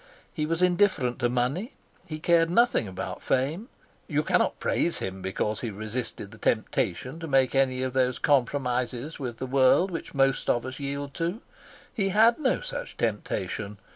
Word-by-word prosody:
He 150 -3 -2
was 165 +2 0
indifferent 175 -9 +2
to 120 -1 +2
money. 130 - -1 0.3
He 155 - -5
cared 165 +1 +3
nothing 235 - +3
about 95 0 -6
fame. 155 - -1 0.4
You - - 0
cannot - - +1
praise 170 - +1
him 95 0 -5
because 100 +3 -2
he 120 - -3
resisted 110 0 -5
the 110 - -14
temptation 115 - -1
to 165 - -6
make 135 -3 +3
any 130 -1 +2
of 130 -1 -2
those 130 -1 +1
compromises 130 0 0
with 120 -4 -4
the 130 - -4
world 135 +8 +4
which 165 -3 -6
most 135 -1 +2
of 120 0 +1
us 130 +1 -6
yield 140 0 -4
to. 175 +8 -2 0.5
He 195 -2 0
had 225 +5 +5
no 270 -4 +1
such - - -6
temptation. 105 -2 -2
135 Hz, 170 wpm, -27 LUFS, 120-165 Hz, 0.5 s, had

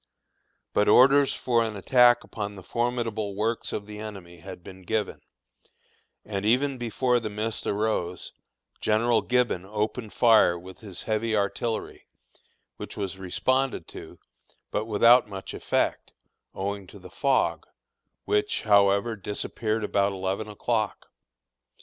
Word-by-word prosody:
But 105 - +2
orders 135 +4 +6
for 120 -2 +1
an 110 -2 -2
attack 120 +4 +4
upon 100 -1 -6
the 95 - -11
formidable 115 -3 -2
works 110 +3 -2
of 100 - -4
the 105 0 -9
enemy 95 -5 -9
had 90 0 -10
been 95 +1 -11
given, 105 +2 -2 1.0
and 100 -2 -4
even 130 +5 +2
before 120 +1 +1
the 110 -2 -4
mist 110 +2 -4
arose, 100 -4 -2 0.5
General 110 +1 +2
Gibbon 125 -7 +1
opened 105 +3 -3
fire 110 -7 +5
with 90 +2 -12
his 100 -5 -8
heavy 110 +1 0
artillery, 110 +3 -2 0.7
which - - -8
was 95 -2 -4
responded 130 +8 -1
to, - - -11 0.5
but 105 - -1
without 115 +2 +5
much 95 -1 -7
effect, - - -1 0.4
owing 100 0 -4
to 100 - -13
the 90 -1 -13
fog, 135 +5 0 0.6
which, 420 0 0
however, 100 +1 +3
disappeared 110 +2 -3
about 100 -1 +1
eleven 95 +3 -3
o'clock. 110 0 -2
105 Hz, 130 wpm, -26 LUFS, 100-120 Hz, 1.0 s, orders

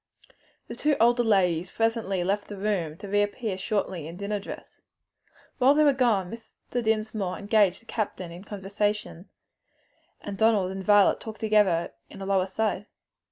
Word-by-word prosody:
The - - -6
two 300 -1 +1
older 240 +2 +4
ladies 180 -5 +2
presently 225 -5 0
left 200 +3 -1
the 205 - -8
room 190 -6 -2
to 200 - -9
reappear 205 +1 0
shortly 190 -5 -2
in 165 +2 -9
dinner 205 +1 -2
dress. 195 - -10 0.8
While 270 +3 +5
they 305 - +5
were 290 -2 +5
gone 225 -9 +1
Mr. 230 +1 -6
Dinsmore 215 -4 -1
engaged 205 -1 +2
the - - -26
captain 195 -6 -4
in 175 +3 -10
conversation, 205 -2 -3 0.9
and 200 -1 -7
Donald 215 -4 +3
and 190 0 -5
Violet 205 0 +5
talked 220 -1 -9
together 210 -6 +2 0.2
in 195 - -11
a 195 - -5
low 195 -1 +2
aside. 205 +1 -2
205 Hz, 160 wpm, -26 LUFS, 190-220 Hz, 0.9 s, While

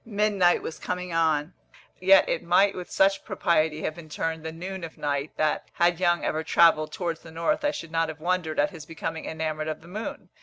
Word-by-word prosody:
Midnight 205 -5 +2
was 160 - -6
coming 180 -1 -4
on, 160 0 +1 0.5
yet 190 +1 +6
it - - 0
might 195 +3 +4
with 180 -1 -7
such 195 0 +2
propriety 155 -2 +1
have - - -1
been 155 -1 -12
termed 160 +1 -3
the 160 - -4
noon 185 +3 -6
of 165 - -8
night 145 0 -1
that, 155 -1 0
had 175 0 +2
Young 175 -2 +2
ever 160 +1 -1
travelled 155 -2 +4
towards 170 -2 -3
the 165 - -13
north, 170 - -1
I 295 - +3
should 165 - -6
not 165 -1 +1
have 160 0 -7
wondered 175 -1 -1
at 200 - +2
his 160 -5 -10
becoming 165 0 -5
enamoured 155 -1 -3
of 155 0 -4
the 165 - -15
moon. 210 +5 -6
165 Hz, 215 wpm, -26 LUFS, 155-180 Hz, 0.5 s, yet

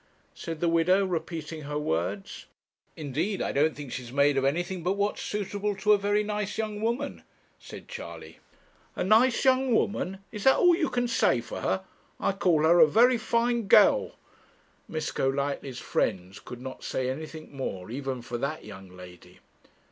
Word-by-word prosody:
said 165 -2 -6
the 170 - +2
widow, 175 +4 +3
repeating 165 -3 -4
her 145 0 -4
words. 95 - -3 0.5
'Indeed 160 +7 -2
I - - -1
don't 150 +2 +2
think 145 -3 -8
she's 120 -1 -6
made 140 +1 +3
of 135 - +1
anything 175 +6 -1
but 180 +3 0
what's 200 +1 -1
suitable 205 0 -3
to 210 +2 +3
a - - +5
very 205 +1 +1
nice 210 -1 -3
young 215 -1 -3
woman,' 235 +3 -2 0.4
said - - -11
Charley. 485 0 -9 0.6
'A - - -1
nice 225 +7 +4
young 260 -2 +3
woman! 195 -3 0
Is 210 -2 -6
that 265 - +7
all 355 -1 +5
you 330 -4 0
can 245 0 0
say 235 - +2
for - - -7
her? - - -1 0.4
I - - +1
call 180 -5 +2
her 170 +2 +5
a 160 - +8
very 235 +8 +4
fine 235 0 0
girl.' - - +5 0.7
Miss 155 -1 -3
Golightly's 140 -1 -2
friends 95 -5 -2
could 125 0 -10
not 130 0 -8
say 130 - -2
anything 155 +2 -6
more, 100 -7 -5
even 130 -1 -4
for 120 -1 -5
that 145 +5 -3
young 95 -3 -11
lady. 90 -1 -14
165 Hz, 170 wpm, -27 LUFS, 135-210 Hz, 0.7 s, a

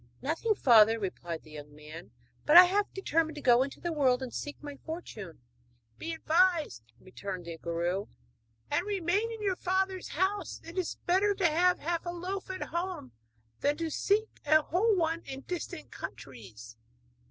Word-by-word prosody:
'Nothing, 330 - 0
father,' 225 - +6
replied 175 -5 -5
the 155 - -16
young 145 -1 -10
man, 155 +1 -11 0.3
'but 305 +3 +7
I 360 - +13
have 400 +3 0
determined 325 -4 0
to 295 - -7
go 245 -1 +6
into 275 +1 -3
the 345 -1 -3
world 265 -4 +2
and 250 - -6
seek 290 - -5
my 290 -1 -8
fortune.' 215 - -8 0.6
'Be 330 - -4
advised,' 320 - +1
returned 185 -1 -7
the 170 -1 -6
guru, 175 +5 -2 0.6
'and - - +1
remain 400 +3 0
in 445 -2 -7
your 390 -2 +1
father's 375 0 -1
house; 380 +5 -1
it 335 - -10
is 370 -3 -2
better 395 +3 +3
to 385 - 0
have 355 +3 +3
half 335 +2 -2
a - - 0
loaf 365 +3 -5
at 375 0 -4
home 345 - -4 0.5
than 290 +1 +1
to 330 -1 -3
seek 425 +7 0
a 310 +1 +4
whole 415 +8 +2
one 330 -1 0
in 270 0 -7
distant 355 +4 -6
countries.' 110 -3 -10
320 Hz, 170 wpm, -30 LUFS, -, 0.6 s, I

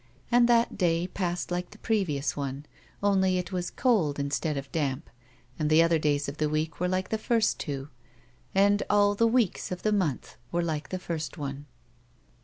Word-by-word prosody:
And 240 0 +5
that 235 -3 +3
day 170 -2 +2
passed 180 -1 -3
like 180 0 -2
the 210 - -14
previous 180 -12 0
one, 140 0 -4 0.4
only 190 -2 +3
it 180 +1 -3
was 180 -2 -2
cold 195 - +1
instead 140 +1 -1
of 140 0 -6
damp, 140 -6 -2 0.5
and 150 -1 +1
the 155 +1 +6
other 165 -1 +3
days 145 -1 +1
of 140 +2 -5
the 155 -1 0
week 155 +2 -2
were 180 - +1
like 185 +1 -1
the 220 - -1
first 225 -1 +1
two, 140 -2 -4 0.7
and 200 +1 +4
all 205 0 +4
the 230 +3 +3
weeks 225 -7 +1
of 180 - -5
the 215 - +2
month 175 -10 -1
were 175 0 0
like 155 -3 -3
that 185 -1 -4
first 165 0 -4
one. 140 -1 -5
175 Hz, 190 wpm, -28 LUFS, 150-200 Hz, 0.7 s, the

